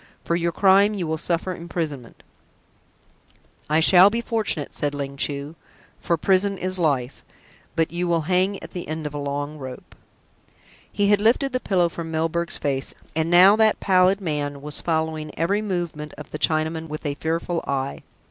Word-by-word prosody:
"For 170 - 0
your 170 0 0
crime 200 +3 +4
you 185 -4 -2
will 160 0 -2
suffer 170 +2 -2
imprisonment" 160 -8 -6 1.5
"I 155 +1 +3
shall 185 +3 +7
be 230 +3 -2
fortunate," 220 -10 -1
said 145 -1 -2
Ling 140 -1 -5
Chu; 140 +2 -3 0.4
"for 170 - 0
prison 195 +3 +2
is 185 0 -1
life. 140 -6 -1 0.5
But 165 -1 +1
you 175 +1 -2
will 170 -1 +1
hang 185 +4 +1
at - - -9
the 175 - -6
end 155 0 -4
of 150 - -4
a 145 - -4
long 145 +1 -4
rope." 130 -2 -9 1.0
He 200 0 +1
had 205 -1 +4
lifted 250 +5 +2
the 255 - +1
pillow 185 -7 +1
from 165 -1 -6
Milburgh's 165 +1 -1
face, 135 -1 -1 0.2
and 160 +1 0
now 185 +4 +7
that 220 -1 +3
pallid 185 0 +3
man 145 -4 -3
was 150 0 -2
following 160 -2 -1
every 195 +6 +1
movement 175 -7 -4
of 150 - -10
the 150 - -5
Chinaman 160 +1 0
with 155 +1 -7
a 145 - -1
fearful 165 +3 -2
eye. 135 0 -2
165 Hz, 175 wpm, -23 LUFS, 150-185 Hz, 1.5 s, shall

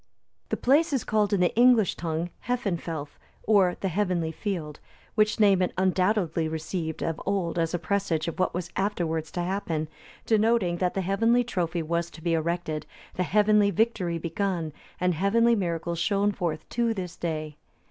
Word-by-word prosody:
The - - -1
place 290 +5 +3
is 265 - +1
called 210 -1 +1
in 200 -3 +2
the 175 - +2
English 240 -4 +5
tongue 165 +1 -3 0.2
Hefenfelth, 170 -11 -3 0.2
or 195 -4 +4
the 195 - 0
Heavenly 180 -3 0
Field,(290) 160 -4 -6
which 215 -1 +2
name 200 -3 +5
it 180 - +1
undoubtedly 185 -3 +1
received 160 +1 -4
of 165 -1 -2
old 185 -4 -1
as 165 +1 0
a - - +1
presage 170 -1 -1
of 170 - -4
what 185 - +2
was 175 -1 -5
afterwards 170 -5 -1
to 175 - -2
happen, 175 -4 -2 0.4
denoting, 220 -5 +2
that 180 0 0
the 195 - 0
heavenly 225 +6 +2
trophy 175 -7 -2
was 170 +1 -1
to 160 - -13
be 170 - +1
erected, 165 -1 -2 0.3
the - - -3
heavenly 210 +2 +4
victory 200 -4 0
begun, 170 -1 -2 0.3
and 180 0 +2
heavenly 225 +7 +3
miracles 170 -3 -2
shown 200 +3 +2
forth 170 -6 -3
to 235 -1 0
this 180 -3 -5
day. 155 -3 -4
180 Hz, 170 wpm, -27 LUFS, 165-205 Hz, 0.4 s, English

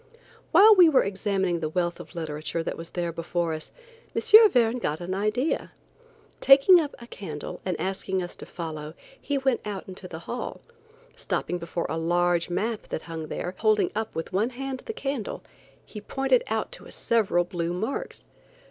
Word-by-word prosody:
While 405 +6 +9
we 360 -5 +7
were 285 - +4
examining 190 -3 -1
the 155 -1 -2
wealth 175 +1 -1
of - - -11
literature 160 0 -3
that - - -3
was 165 0 -8
there 175 -1 -2
before 170 0 -2
us, 155 0 -6 0.5
M. 435 0 +8
Verne 245 - +2
got 150 -8 -2
an 175 +1 -4
idea. 215 +9 -1 0.7
Taking 275 +7 +7
up 295 -3 -3
a 235 - -11
candle 160 -10 -7
and 180 -3 -2
asking 190 0 -2
us 175 - -7
to - - -9
follow, 155 -2 -6 0.3
he 285 - -1
went 265 -3 +1
out 205 -3 -5
into 185 0 -8
the 165 - -7
hall; 245 - -5 0.5
stopping 180 - -2
before 170 0 -3
a 160 - -2
large 175 +1 +1
map 215 +5 -2
that - - -4
hung 160 -2 -6
there, 180 - -4
holding 215 -2 +3
up 220 +1 -3
with 165 - -5
one 210 +5 +2
hand 265 +1 -5
the 450 - -3
candle, 270 - -4 0.4
he 210 - -9
pointed 270 - +1
out - - -2
to - - -9
us - - -8
several 205 -6 +2
blue 175 -1 -3
marks. 220 - -4
190 Hz, 180 wpm, -26 LUFS, 170-245 Hz, 0.7 s, While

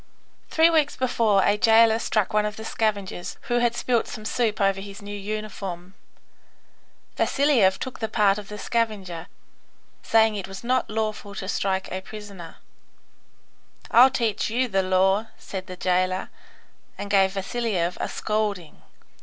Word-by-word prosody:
Three 325 +1 +4
weeks 310 -3 +2
before 225 -6 +2
a 205 - +3
jailer 225 0 +5
struck 215 -1 0
one 210 0 +3
of 210 - -5
the 220 - -8
scavengers 205 -6 -2
who 240 0 0
had 240 -1 +1
spilt 240 -1 0
some 215 - -8
soup 220 -1 0
over 195 -1 +2
his 200 0 -9
new 205 0 -7
uniform. 195 -3 -6 1.2
Vasiliev 255 -10 +3
took 260 - -6
the 220 - -1
part 210 -2 +2
of 205 - -10
the 210 - -7
scavenger, 200 -7 -2 0.7
saying 225 -1 +3
that 205 - -3
it 190 - -6
was 195 +2 -9
not 255 +2 0
lawful 215 -1 -3
to 190 - -5
strike 190 -1 -1
a 185 - -3
prisoner. 200 -5 -10 1.4
"I'll 250 +3 +8
teach 230 -5 -1
you 250 +3 +1
the 195 -4 +1
law," 190 +3 +2
said 190 -1 -7
the 185 - -8
jailer, 185 +1 0 0.7
and 200 - -5
gave 190 -2 +4
Vasiliev 195 -3 -1
a - - -2
scolding. 210 -6 -3
210 Hz, 155 wpm, -24 LUFS, 190-225 Hz, 1.4 s, I'll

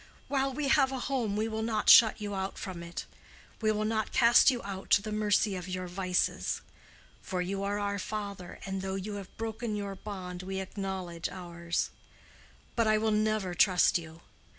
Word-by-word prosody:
While 275 -1 +1
we 285 +2 -2
have 270 -2 +4
a 265 - -2
home 245 -6 -1
we 215 +1 0
will 220 0 -3
not 220 -1 -1
shut 220 -2 +8
you 205 -1 -4
out 190 0 -3
from 185 -3 -6
it. 170 0 -6 0.6
We 215 -1 +3
will 215 0 -1
not 220 0 -1
cast 240 +1 +6
you 245 -3 -1
out 195 -1 -6
to - - +6
the 215 - -4
mercy 210 -1 +2
of 180 -1 -6
your 185 0 -3
vices. 180 0 0 0.6
For 185 - -3
you 195 +2 -2
are 200 +1 -1
our 200 0 -1
father, 200 -3 -5
and 195 -1 -3
though 190 0 -3
you 205 +2 -4
have 195 -2 -10
broken 225 0 -3
your 200 -1 -3
bond, 185 -3 -7
we 190 +1 -4
acknowledge 190 -3 -4
ours. 170 -2 -3 0.8
But 230 -2 +2
I 215 0 +4
will 220 0 +1
never 215 -3 +1
trust 180 0 +4
you. 165 0 -11
200 Hz, 190 wpm, -30 LUFS, 185-215 Hz, 0.8 s, shut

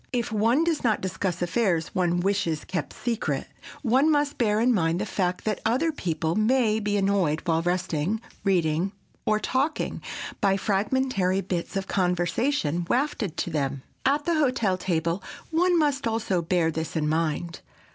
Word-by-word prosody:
If 240 -2 -1
one 225 +8 +3
does 330 -2 0
not 220 -4 +2
discuss 185 -1 -2
affairs 175 -4 0
one 175 -1 +1
wishes 190 -5 0
kept 180 -5 -3
secret, 235 -2 -2 0.4
one 265 +5 +4
must 290 -1 +1
bear 215 -3 +2
in 245 +2 +4
mind 165 -4 +1
the 210 - -1
fact 180 -3 -1
that 215 -1 -1
other 255 +9 +2
people 165 - -2
may 220 +1 +2
be 205 -1 0
annoyed 195 -6 +1
while 165 -1 +2
resting, 180 +2 -1 0.2
reading 180 -1 +1 0.3
or 215 0 +3
talking, 270 +7 -1 0.4
by 195 -2 +3
fragmentary 200 -1 +1
bits 180 -1 -3
of 195 - -2
conversation 180 - 0
wafted 240 - 0
to 175 - -2
them. 140 -3 -2 0.2
At 285 +2 +2
the 340 - +2
hotel 250 -9 +2
table 170 0 -1 0.3
one 350 +2 +3
must 285 -5 +1
also 220 -5 0
bear 165 -1 +1
this 160 +1 -4
in 155 -2 +1
mind. 165 +2 -1
195 Hz, 155 wpm, -26 LUFS, 170-240 Hz, 0.4 s, one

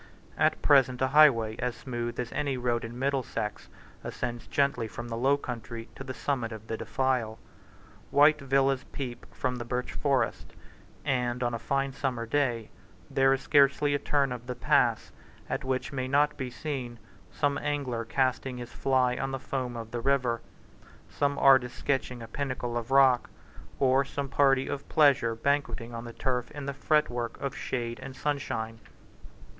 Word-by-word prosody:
At - - +1
present 130 -3 +5
a 130 - +2
highway 125 -7 +5
as 125 -1 -2
smooth 120 -2 -4
as 120 -1 -3
any 140 -2 -1
road 120 -1 0
in 115 +1 -7
Middlesex 130 -5 -2 0.3
ascends 120 -1 -4
gently 140 -5 +1
from 120 +2 -7
the 115 - -3
low 135 +4 +3
country 115 -3 -7
to - - -8
the 130 - -6
summit 125 -5 -2
of 110 -1 -8
the 115 - -3
defile. 115 0 -1 0.7
White 150 +2 +5
villas 135 0 +2
peep 125 -4 -6
from 125 -1 -2
the 120 - -4
birch 125 +1 -3
forest; 135 -5 -1 0.5
and, 125 -3 0
on 120 -1 0
a 115 - -2
fine 135 +2 -1
summer 125 -3 -2
day, 120 -3 0 0.4
there 135 0 +4
is 135 0 +1
scarcely 140 +1 +4
a 145 - +1
turn 140 -2 +1
of 125 -1 -6
the 125 - -3
pass - - +2 0.4
at - - -2
which 130 +3 -2
may 130 -1 -2
not 145 +2 +3
be 130 -1 -4
seen 130 -4 -5 0.3
some 145 0 0
angler 135 -6 -2
casting 130 +1 0
his 120 -1 -8
fly 130 -2 +2
on 135 - -2
the 135 - -3
foam 125 -2 -3
of 115 -1 -7
the 120 - -3
river, 125 -3 +1 0.7
some 140 0 0
artist 130 -3 +5
sketching 125 -3 -1
a - - -8
pinnacle 125 -1 -3
of 120 0 -3
rock, 135 -2 +5 0.5
or 135 0 +4
some 140 0 -4
party 135 -1 +3
of 140 - -5
pleasure 135 -7 +4
banqueting 135 -2 -1
on 115 0 -6
the 115 - -8
turf 125 -1 -1
in 145 -2 -7
the 140 - -3
fretwork 135 -5 0
of 140 -1 -3
shade 120 -2 -3
and 130 - -8
sunshine. 130 -7 -3
130 Hz, 170 wpm, -28 LUFS, 120-140 Hz, 0.7 s, present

